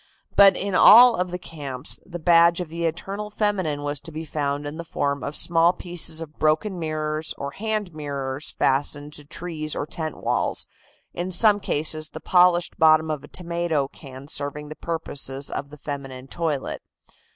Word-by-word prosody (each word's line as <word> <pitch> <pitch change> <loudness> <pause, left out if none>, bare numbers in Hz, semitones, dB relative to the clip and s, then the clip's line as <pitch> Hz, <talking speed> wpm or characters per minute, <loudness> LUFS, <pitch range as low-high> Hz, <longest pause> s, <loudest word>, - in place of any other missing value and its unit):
But 200 -1 +7
in 200 -1 -2
all 235 +5 +9
of 180 0 -1
the 180 - -4
camps 145 -6 -4
the 175 -2 -7
badge 170 +1 +5
of 175 -3 -4
the 170 +1 -3
eternal 195 +6 -4
feminine 190 -9 -1
was 145 -1 -1
to 165 - -11
be 160 +1 -6
found 145 -1 -2
in 145 +2 -6
the 170 - -5
form 140 -3 -2
of 145 - -4
small 170 +1 +3
pieces 170 -3 -1
of 155 -2 -10
broken 160 +5 +1
mirrors, 155 -1 -3
or 140 0 -5
hand 210 0 -3
mirrors 140 -1 -5
fastened 145 +2 0
to 150 - -7
trees 155 -1 -4
or - - -2
tent 155 0 -5
walls, - - -1 0.5
in 175 +1 -3
some 205 +3 +4
cases 155 -3 0
the - - -8
polished 180 -1 +3
bottom 155 0 +5
of 150 -2 -4
a - - -11
tomato 170 -5 -1
can 135 -2 -11
serving 145 0 -4
the 155 - -7
purposes 145 -5 -4
of 140 - -4
the 150 - -12
feminine 135 -3 -7
toilet. 155 -2 -2
155 Hz, 175 wpm, -24 LUFS, 145-175 Hz, 0.5 s, all